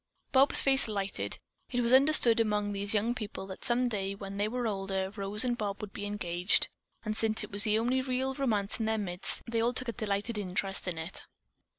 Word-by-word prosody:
Bob's 270 +1 +6
face 270 -2 +3
lighted. 200 -2 -3 0.3
It 245 -1 -1
was 235 +1 +2
understood 265 -4 +6
among 210 -2 0
these 200 +2 +1
young 220 +3 +1
people 215 -5 -6
that 190 -1 -10
some 245 +1 +1
day, 200 -4 -3
when 195 0 -8
they 205 +1 0
were 245 +2 -3
older, 195 -2 -2
Rose 205 +2 -1
and 245 -1 0
Bob 205 -3 -4
would 210 -2 -8
be 205 - -5
engaged, 180 -2 0 0.4
and 215 0 -2
since 220 0 +1
it - - -9
was 200 +2 +3
the 215 0 +2
only 245 +3 +1
real 260 +1 -1
romance 225 -7 -1
in 220 - -1
their 220 0 0
midst, 180 -3 +1
they 230 -1 -1
all 240 +2 +1
took 255 -1 -2
a - - -3
delighted 210 0 -3
interest 195 0 -3
in 175 -2 -3
it. 160 +3 -5
210 Hz, 215 wpm, -30 LUFS, 200-240 Hz, 0.4 s, Bob's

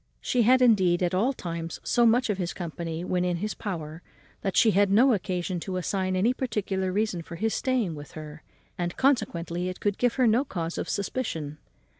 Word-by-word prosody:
She 250 - +1
had, 255 +3 +5
indeed, 185 -7 +4
at 175 +1 0
all 215 +9 +2
times 170 -8 -5
so 240 -1 +3
much 235 0 +3
of 195 - -3
his 175 -2 -2
company, 165 -1 -5
when 180 -1 0
in 180 -1 0
his 210 +4 -3
power, 160 -5 -6 0.4
that 195 - -2
she 225 - +6
had 200 0 +3
no 240 +6 +5
occasion 180 -2 -2
to 185 +2 -4
assign 185 +1 -1
any 215 +7 +2
particular 200 -7 -2
reason 205 -3 -1
for 170 +1 -9
his 220 +5 -1
staying 250 -9 0
with 145 -2 -10
her, 155 -1 -9 0.4
and 175 0 -2
consequently 180 -9 0
it 185 - -7
could 205 -1 -1
give 245 -1 +2
her 255 - +3
no 230 +4 +4
cause 170 - -4
of - - -4
suspicion. 165 - -3
185 Hz, 200 wpm, -27 LUFS, 170-225 Hz, 0.4 s, she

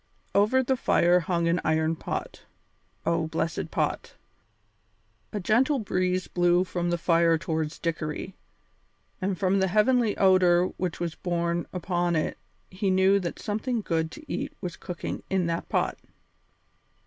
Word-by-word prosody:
Over 215 +6 +4
the 265 +1 +1
fire 175 -7 +3
hung 170 -1 0
an 170 +1 +1
iron 160 +1 +1
pot. - - -5 0.6
Oh, 165 -1 +1
blessed 160 +1 -2
pot! - - -2 1.2
A 210 - -3
gentle 245 +9 +2
breeze 185 -4 -1
blew 175 0 +3
from 175 -2 -2
the 175 - +1
fire 165 -1 +3
towards 160 -2 -3
Dickory, 165 +2 -3 0.9
and 190 0 -1
from 195 +2 +2
the 190 - +2
heavenly 215 +3 +2
odour 185 -2 +4
which 180 -3 -3
was 170 -2 -2
borne 170 -1 -2
upon 175 -1 -1
it 155 - -1 0.3
he 190 +1 -1
knew 190 +1 +4
that 175 -3 -4
something 220 +3 -2
good 160 -4 -1
to 310 - -12
eat 280 +1 -3
was 175 -2 -5
cooking 180 -2 -5
in 190 -2 +1
that 170 0 -3
pot. - - 0
180 Hz, 145 wpm, -27 LUFS, 170-195 Hz, 1.2 s, Over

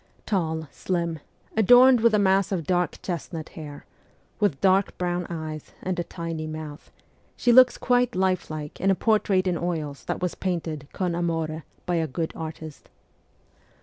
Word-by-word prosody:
Tall, 160 -5 -1
slim, 170 -3 -2 0.4
adorned 245 +3 +7
with 230 -1 +4
a - - +4
mass 195 -2 +3
of 175 -5 -1
dark 180 +1 0
chestnut 165 -2 -5
hair, 150 -2 -9 0.5
with 205 -10 +1
dark 195 0 +2
brown 175 -1 -1
eyes 155 -2 -6
and 185 -1 -2
a - - 0
tiny 165 -2 -5
mouth, 155 -1 -8 0.5
she 245 - +3
looks 255 +1 +7
quite 245 -3 +2
lifelike 180 -5 -2
in 195 - +2
a 195 - +4
portrait 205 -3 +2
in 180 -3 0
oils 155 -5 -3
that - - -2
was 180 -1 -1
painted 165 -6 -3
con 180 -2 -2
amore 165 -2 -2 0.2
by 175 -1 0
a 160 -1 0
good 160 +4 -3
artist. 155 -1 -8
175 Hz, 155 wpm, -25 LUFS, 160-190 Hz, 0.5 s, adorned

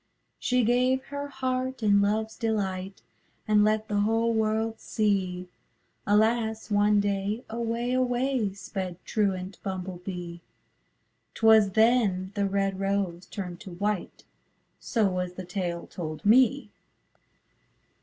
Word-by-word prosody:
She 250 -1 +2
gave 250 +3 +2
her 285 0 -3
heart 260 -2 -3
in 200 -1 +5
loveâs 220 +2 0
delight 195 -4 -2 0.4
And 210 -1 +4
let 215 +1 +1
the 205 -1 0
whole 225 +2 +2
world 220 0 0
see; 190 -4 -1 0.6
Alas! 220 +1 +1
one 205 0 +4
day, 200 +3 -1
away, 235 +1 -2
away, 250 -3 +1
Sped 185 -2 -5
truant 195 -3 -1
Bumble 185 -2 -5
Bee; 175 -2 -6 0.9
âTwas 220 -3 +5
then 220 -5 +3
the 200 -1 0
red 195 -1 -1
rose 195 -3 -1
turned 180 -3 -6
to 185 -4 -9
whiteâ 205 0 -3 0.6
So 225 -4 0
was 180 -1 -2
the 185 0 -7
tale 175 -2 -3
told 155 +1 -7
me. 255 +5 +4
210 Hz, 120 wpm, -27 LUFS, 190-225 Hz, 0.9 s, in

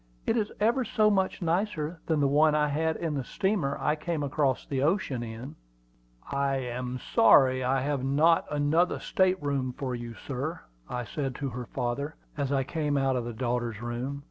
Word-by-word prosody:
"It - - +2
is 215 -3 0
ever 235 +5 +2
so 215 -2 +3
much 190 -1 0
nicer 170 -2 -1
than 160 -3 +2
the 140 - +4
one 150 +2 +4
I 150 -1 +2
had 160 +2 0
in 165 -3 -2
the 140 -2 -2
steamer 190 -4 -1
I 150 - +1
came 155 -1 -3
across 140 -2 0
the 135 -2 -2
ocean 145 - +1
in!" 120 +4 -7 0.8
"I 140 0 +1
am 125 -1 -3 0.2
sorry 130 +3 +6
I 130 +1 +1
have 140 -1 -1
not 155 +5 +3
another 150 +4 +2
state 185 0 +2
room 135 -3 -1
for 130 0 -4
you, 120 -1 -6
sir," 140 +8 -4 0.3
I 125 - -3
said 130 +4 -3
to 140 0 -3
her 125 0 -6
father, 140 +6 -3 0.2
as 140 -2 -2
I 135 -1 +2
came 150 0 -1
out 135 -1 +2
of 120 -2 -1
the 120 - -4
daughter's 120 -2 -2
room. 120 +4 -4
140 Hz, 190 wpm, -28 LUFS, 130-160 Hz, 0.8 s, sorry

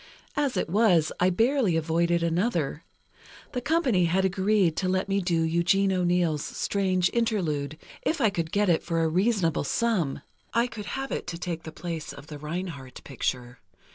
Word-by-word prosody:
As 285 -3 0
it - - 0
was, 180 -4 +3
I 180 - +4
barely 225 - +2
avoided 170 +1 +1
another: 170 - 0 0.7
The 250 - -3
company 265 - +2
had 190 +3 +2
agreed 190 -2 +2
to 185 - 0
let 185 +1 0
me 195 0 +1
do 175 -2 +1
Eugene 175 +4 +2
O'Neill's 175 -4 +1
'Strange 185 -3 0
Interlude,' 165 -11 -1 0.2
if 325 - -1
I 220 - +3
could 165 -4 -3
get 205 0 +2
it 170 -3 +3
for 165 -1 -1
a - - +2
reasonable 185 -1 +1
sum—I 220 - -1
could 225 -4 -7
have 270 0 -4
it - - -3
to 170 - -4
take 170 -2 -4
the 160 - -8
place 165 -1 -5
of - - -11
the 150 -1 -9
Reinhardt 150 -4 -6
picture. 125 -2 -4
180 Hz, 170 wpm, -27 LUFS, 165-205 Hz, 0.7 s, I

